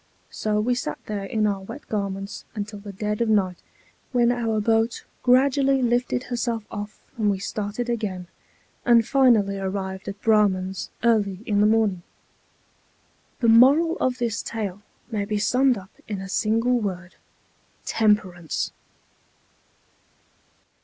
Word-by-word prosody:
So 210 -1 -1
we 240 +4 +1
sat 245 - -3
there 205 -2 -4
in 215 +2 0
our 200 -2 0
wet 260 +9 -10
garments 195 -1 -4
until 205 0 -5
the 200 0 -8
dead 210 +3 -3
of 230 - +1
night, 190 -4 +1 0.5
when 240 -2 +3
our 230 -3 0
boat 225 +2 +1 0.2
gradually 270 +1 +3
lifted 245 +1 +1
herself 235 -3 -2
off 210 0 -6 0.2
and 210 -1 +2
we 200 - +1
started 210 +4 -4
again, 210 -6 -3 0.6
and 235 -2 +4
finally 220 -8 +3
arrived 190 0 -4
at 200 0 -6
Braman's 195 -4 +2
early 210 -5 +2
in 205 -1 +2
the 210 - +5
morning. 215 -5 +2 1.4
The 235 - +3
moral 280 +9 +6
of 255 -1 0
this 235 -4 -1
tale 205 -4 -4 0.3
may 210 -2 -1
be 210 +1 -2
summed 250 +4 +3
up 190 0 -11 0.2
in 205 -3 -4
a 195 - -6
single 230 +6 +1
word, 185 -4 -4 0.7
TEMPERANCE. 190 -6 0
215 Hz, 135 wpm, -24 LUFS, 200-235 Hz, 1.4 s, moral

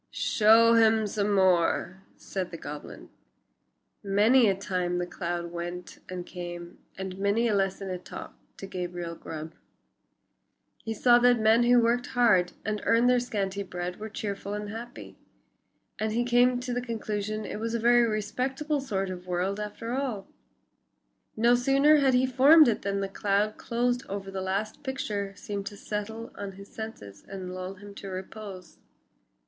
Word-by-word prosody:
"Show 225 +2 +5
him 220 -1 +4
some 205 0 -1
more," 185 0 +2 0.2
said 185 -2 -4
the 165 - -7
goblin. 150 -2 -9 0.9
Many 215 +4 +4
a 195 - +2
time 180 -2 -2
the 175 - -1
cloud 170 -1 -4
went 175 +1 -6
and 180 -1 -5
came, 175 -1 -8 0.2
and 190 0 -6
many 200 +4 +2
a 220 - +1
lesson 195 -1 -1
it 180 0 -5
taught - - -8 0.2
to - - -7
Gabriel 175 -2 -5
Grubb. 160 -1 -8 1.3
He 225 - -4
saw 240 +2 +5
that 245 0 +5
men 220 +2 +5
who 245 0 +6
worked 240 +2 +1
hard 220 -8 +3
and 210 -1 -2
earned 235 +2 +4
their 250 - +4
scanty 200 -5 -2
bread 180 -1 -5
were 220 +1 -6
cheerful 200 -1 -4
and 210 0 -5
happy. 230 +3 -9 0.8
And 220 0 -1
he 240 +2 +1
came 245 +1 +4
to 250 0 -3
the 245 - -1
conclusion 215 -2 -3
it - - -5
was 230 +1 -2
a - - 0
very 240 +1 +5
respectable 260 +8 -2
sort 195 -7 -2
of 180 0 -8
a - - -11
world 185 +3 -1
after 210 +3 -5
all. 250 -7 -2 1.1
No 235 +2 +5
sooner 275 +5 +5
had 270 -3 +3
he 255 +1 +4
formed 275 +5 +7
it 225 - +1
than 200 0 -1
the 195 - -1
cloud 205 +2 0
closed 245 +1 -1
over 195 0 -5
the 190 -1 -4
last 195 +3 -3
picture 210 -8 -3
seemed 200 -1 -5
to 205 - -7
settle 220 +3 -5
on 200 -1 -6
his 200 +1 -12
senses 105 - -8
and 185 -2 -6
lull 185 +1 -6
him 205 +1 -12
to 200 - -9
repose. 190 0 -8
205 Hz, 165 wpm, -28 LUFS, 190-235 Hz, 1.3 s, formed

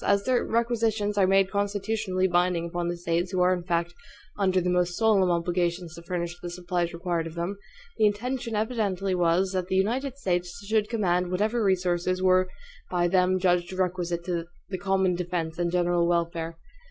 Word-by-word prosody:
As 200 0 +2
their 255 -1 +2
requisitions 225 -3 0
are 195 -2 +4
made 195 0 +3
constitutionally 200 -2 0
binding 175 -1 +1
upon 170 0 -3
the 175 0 -2
States, 170 +1 -1
who 185 -2 0
are 180 +1 +4
in 180 - -2
fact 170 0 -1 0.4
under 190 -2 +2
the 180 - -2
most 180 -1 +1
solemn 210 -5 +4
obligations 175 0 -1
to 170 - -10
furnish 170 0 -3
the 175 - -5
supplies 175 -1 -2
required 170 -1 -2
of 165 - -9
them, 175 +4 -3 0.4
the 215 - +6
intention 235 +2 -2
evidently 210 -4 -1
was 180 +1 +2
that 185 -2 -2
the 190 - -1
United 250 +8 0
States 180 -7 -2
should 215 0 +1
command 180 -6 +1
whatever 215 +5 0
resources 185 -1 +1
were 185 0 +3 0.4
by 175 -1 +1
them 185 +1 +3
judged 180 -1 +1
requisite 180 -2 -1
to 170 -2 -2 0.2
the 185 -1 -4
"common 190 -2 +1
defense 175 -2 -3
and 170 -1 0
general 175 -1 +2
welfare." 170 -1 -1
180 Hz, 175 wpm, -26 LUFS, 175-200 Hz, 0.4 s, the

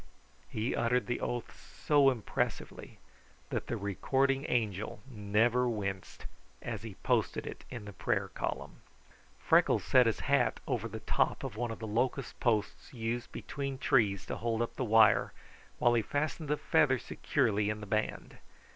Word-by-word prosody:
He 110 +4 -2
uttered 125 +2 +1
the 120 - -2
oath 120 -2 -3 0.3
so 145 -2 +6
impressively 120 -5 -3 0.5
that - - -2
the - - -2
recording 135 - 0
angel 110 -4 -1
never 120 +2 +1
winced 95 -4 -4 0.3
as - - -5
he - - -8
posted - - +1
it - - -8
in 120 -4 -7
the 105 - -8
prayer - - -1
column. - - -4 0.6
Freckles - - +3
set 125 -2 +5
his 115 - 0
hat 135 -5 +2
over 115 -1 -1
the 110 0 -7
top - - 0
of 130 -5 -5
one 120 +1 -2
of 115 - -5
the 110 - -6
locust 125 +5 -1
posts 110 -4 0
used 120 +1 -3
between 140 -1 -5
trees 105 -7 +2
to - - -4
hold 115 0 0
up 120 - -5
the - - -2
wire 110 -2 +5 0.4
while 120 - +4
he 115 - +3
fastened 150 +6 -2
the 150 - +2
feather 150 -5 +3
securely 105 -2 0
in 105 0 -2
the 105 - -7
band. 110 +1 -2
120 Hz, 160 wpm, -32 LUFS, 105-130 Hz, 0.6 s, so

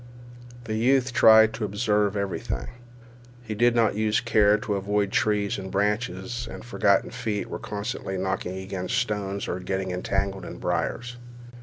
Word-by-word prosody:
The 110 -2 -4
youth 130 +3 +2
tried 110 -1 +7
to 115 - -5
observe 105 0 +1
everything. 100 -2 -3 0.7
He 110 -2 -5
did 120 +3 +3
not 115 -3 +3
use 110 +1 +1
care 105 -3 +4
to 105 0 -3
avoid 100 0 0
trees 105 -2 +1
and 95 0 -6
branches, 105 +3 -1
and - - -8
his 125 - -14
forgotten 100 -3 +2
feet 115 -4 -3
were - - -4
constantly 100 -2 -4
knocking 95 0 -2
against 95 +3 -3
stones 100 -4 -2
or 90 - -3
getting 95 0 -3
entangled 95 +1 -2
in - - -8
briers. 120 0 -2
105 Hz, 155 wpm, -25 LUFS, 95-115 Hz, 0.7 s, tried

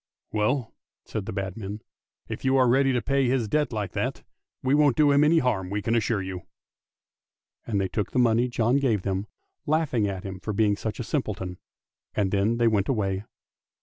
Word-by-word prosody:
Well," 110 +3 0 0.3
said 105 -3 -5
the - - -3
bad 95 -2 -3
men, 105 -1 -6 0.2
" - - -68 0.2
if - - -6
you 130 0 +3
are 130 -1 +5
ready 135 +2 +4
to 125 -2 0
pay 135 -1 +2
his 125 -3 +1
debt 150 +6 +1
like 105 -4 -3
that, - - -3 0.4
we 130 +1 +2
won't 145 -4 +4
do 150 -2 +5
him 140 +1 +5
any 160 +2 +5
harm, 110 - +1
we 100 +1 -2
can 115 - 0
assure 110 -3 +1
you! 95 -1 -5 0.6
" - - -46
And 105 -4 0
they 95 - +1
took 100 +2 -2
the - - -2
money 120 0 +4
John 120 +1 +2
gave 115 -9 +1
them, 95 +1 -2 0.4
laughing 145 -8 +1
at 95 -2 -4
him 95 -2 -6
for 105 +3 -4
being 105 0 +2
such 110 +1 -5
a - - -2
simpleton, 105 - -3 0.6
and 100 -3 +1
then 105 +4 +2
they 120 -1 +3
went 105 -3 +1
away. 100 -5 -1
110 Hz, 210 wpm, -26 LUFS, 100-130 Hz, 0.6 s, are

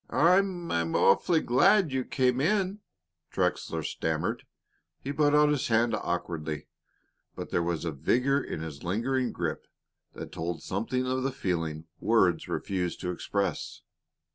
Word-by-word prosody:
"I 175 +4 +5
I'm 170 - -2
awfully 160 - +4
glad 185 - +4
you 130 -1 0
came 130 -1 +1
in," 195 +4 +1 0.5
Trexler - - -1
stammered. - - -2 0.6
He 140 - -3
put 145 0 +3
out 150 0 +5
his 145 -3 0
hand 115 0 +2
awkwardly, 80 -6 -3 0.7
but - - -7
there - - +2
was 85 -1 -2
a 85 - -1
vigor 125 - +1
in - - -5
his 80 -3 -7
lingering 120 +7 0
grip - - -4 0.5
that - - -8
told 85 0 -4
something 125 +6 -2
of 130 +1 -1
the 135 +1 0
feelings 80 -9 -2
words - - +2
refused 90 -3 -2
to 90 - -2
express. 95 0 -3
120 Hz, 140 wpm, -28 LUFS, 85-145 Hz, 0.7 s, I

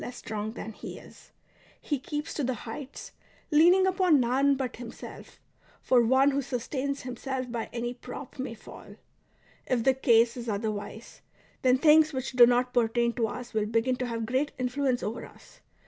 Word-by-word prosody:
less 245 - -7
strong 215 0 -5
than 225 - -7
he - - -9
is; - - -15 0.5
he 290 -3 -2
keeps 295 +3 -5
to 295 - -2
the 255 0 -1
heights, 265 +4 -8 0.4
leaning 350 +5 +6
upon 370 -5 +3
none 265 +3 +3
but 260 -3 -4
himself; 235 -1 -10 0.4
for 250 -2 +3
one 260 +4 +4
who 280 +1 0
sustains 275 +2 -3
himself 255 0 -4
by 235 -2 -4
any 240 0 -3
prop 250 +2 -10
may 255 -3 -4
fall. - - -13 0.7
If 245 -3 +1
the 265 - +4
case 235 -3 +3
is 240 -2 -6
other 215 +1 -1
wise, 210 +2 -8 0.4
then 255 0 +4
things 310 +2 +5
w^hich 260 -1 -4
do 240 -1 +9
not 245 +1 +1
pertain 235 0 +2
to 230 -2 0
us 245 +2 -7
will 215 -1 0
begin 230 +3 +1
to 250 - -2
have 230 -1 -3
great 260 +5 -1
influence 255 0 -1
over 225 +3 -4
us. - - -16
250 Hz, 180 wpm, -28 LUFS, 235-275 Hz, 0.7 s, do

